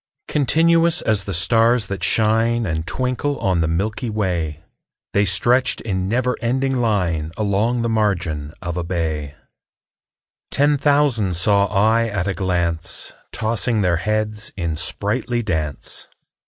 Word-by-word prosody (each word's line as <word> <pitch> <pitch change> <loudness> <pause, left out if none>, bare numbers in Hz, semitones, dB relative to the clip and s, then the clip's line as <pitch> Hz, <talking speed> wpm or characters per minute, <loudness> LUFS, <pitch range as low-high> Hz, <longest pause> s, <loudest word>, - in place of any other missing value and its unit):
Continuous 165 +4 +3
as 105 -3 0
the - - -4
stars 115 +5 +3
that 95 -2 -5
shine 115 +3 +2
And 80 -2 -3
twinkle 130 +7 -1
on 90 -3 +1
the 80 - +1
milky 105 +9 -2
way, 85 -7 -2 0.5
The 100 +1 +3
stretched 120 +7 +2
in 95 -3 -2
never 125 +2 +1
ending 130 +2 0
line 90 -9 0
Along 110 +3 0
the 115 - 0
margin 90 -9 -1
of 85 0 -4
a 90 - -1
bay: 80 -4 -3 1.1
Ten 145 +1 +3
thousand 140 - +2
saw 100 +3 +3
I 110 +3 +2
at 100 -4 -2
a 95 - 0
glance, 85 -3 -2 0.2
Tossing 110 0 0
their 90 -3 +2
heads 105 +3 -2
in 85 -3 -2
sprightly 115 +8 -1
dance. 80 -8 -3
105 Hz, 135 wpm, -20 LUFS, 90-120 Hz, 1.1 s, Continuous